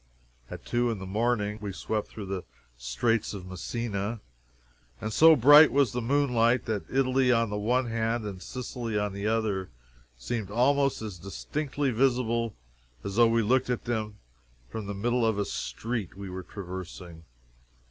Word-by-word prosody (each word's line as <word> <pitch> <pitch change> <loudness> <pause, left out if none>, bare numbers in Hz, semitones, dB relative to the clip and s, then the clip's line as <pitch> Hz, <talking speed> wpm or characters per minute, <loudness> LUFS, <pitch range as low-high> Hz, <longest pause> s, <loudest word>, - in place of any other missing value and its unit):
At - - -9
two 120 0 +1
in 115 - -2
the 95 - -7
morning 105 +1 0
we 100 -2 -4
swept 105 +3 -3
through 105 - -8
the 95 -1 -4 0.3
Straits 60 - -1
of 95 -2 -8
Messina, 100 +3 -4 0.8
and 110 - -4
so 160 +5 +8
bright 145 +4 +8
was 140 -5 +3
the 125 - -2
moonlight 125 -2 +2
that 110 -3 -3
Italy 130 -1 +2
on 115 -3 +2
the 105 - -2
one 125 +5 +1
hand 115 0 -1
and 95 -3 -6
Sicily 120 -2 -4
on 105 -1 -1
the 100 +1 -3
other 110 -4 0 0.5
seemed 110 - -4
almost 135 +3 +2
as 100 -5 -6
distinctly 140 - -3
visible 120 -2 +1 0.5
as 100 +2 -5
though 120 -1 +7
we 115 0 +2
looked 125 +4 +2
at 125 - -2
them 110 -3 -3 0.5
from 110 -3 -5
the 100 - -4
middle 120 +4 0
of 110 -2 +2
a 100 - 0
street 110 -5 -4
we 100 -2 -7
were 95 0 -5
traversing. 90 -3 -8
115 Hz, 165 wpm, -28 LUFS, 100-125 Hz, 0.8 s, so